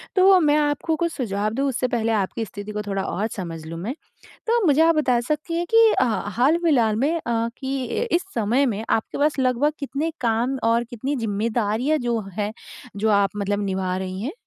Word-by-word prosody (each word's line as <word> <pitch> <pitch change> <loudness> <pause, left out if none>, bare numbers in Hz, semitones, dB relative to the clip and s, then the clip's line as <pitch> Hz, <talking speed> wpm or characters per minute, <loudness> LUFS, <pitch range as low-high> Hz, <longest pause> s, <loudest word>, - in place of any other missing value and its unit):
तो 375 0 +6
मैं 300 -2 +3
आपको 295 +2 0
कुछ 340 +1 -1
सुझाव 210 -5 -1
दूँ 275 +3 0
उससे 255 -1 -1
पहले 230 -2 0
आपकी 220 +2 -1
स्थिति 205 +1 -8
को 210 0 -3
थोड़ा 195 -1 -1
और 210 +4 -2
समझ 165 -4 -6
लूँ 165 +1 -6
मैं। 225 +9 -3 0.5
तो 470 +1 +3
मुझे 300 +1 +4
आप 330 0 +5
बता 255 -6 +2
सकती 305 +2 -2
हैं 345 +1 -1
कि 455 0 +8 0.2
ह 235 -3 +1
हाल 270 +7 +4
फिलहाल 235 -10 +3
में 285 +8 +1
अ, 230 0 0
कि 270 -1 -3 0.3
इस 345 - +3
समय 235 +5 +2
में 220 -2 -2
आपके 220 - -1
पास 295 0 +1
लगभग 260 +3 +2
कितने 285 +3 -2
काम 240 +3 0
और 230 +1 +2
कितनी 260 +4 -4
ज़िम्मेदारियाँ 225 +5 0
जो 240 -3 -1 0.2
हैं 210 +1 -1 0.4
जो 215 +2 +1
आप 200 -1 +3
मतलब 205 0 -1
निभा 190 -1 -1
रही 185 0 -4
हैं? 275 +8 -3
235 Hz, 200 wpm, -23 LUFS, 210-290 Hz, 0.5 s, कि